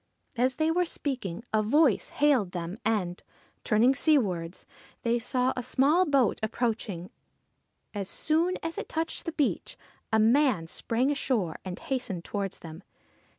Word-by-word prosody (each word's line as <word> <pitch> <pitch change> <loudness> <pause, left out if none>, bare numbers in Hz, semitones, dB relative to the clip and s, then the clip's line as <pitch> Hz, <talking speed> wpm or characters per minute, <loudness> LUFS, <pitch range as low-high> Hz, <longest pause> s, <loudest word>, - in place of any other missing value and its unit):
As 255 +2 +1
they 315 +1 +1
were 360 +2 +2
speaking, 250 - -4
a 215 - +4
voice 260 +2 +3
hailed 265 -11 +2
them; 175 +4 -5
and, 185 -5 -1 0.4
turning 230 +5 +4
sea 305 +2 +4
wards, 180 -7 -3 0.4
they 235 0 +2
saw 250 +2 0
a 250 - -2
small 285 +8 +3
boat 275 -6 +2
approaching. 220 -5 -2 0.8
As 200 -2 -4
soon 330 - +1
as 330 0 -3
it - - -6
touched 325 0 -3
the 330 - -2
beach, 300 -3 -1 0.3
a 220 - +4
man 225 - +3
sprang 230 - -1
ashore, 235 - -1
and 185 -1 -5
hastened 225 -10 -4
towards 200 -2 -3
them. 160 +2 -9
240 Hz, 150 wpm, -28 LUFS, 195-285 Hz, 0.8 s, a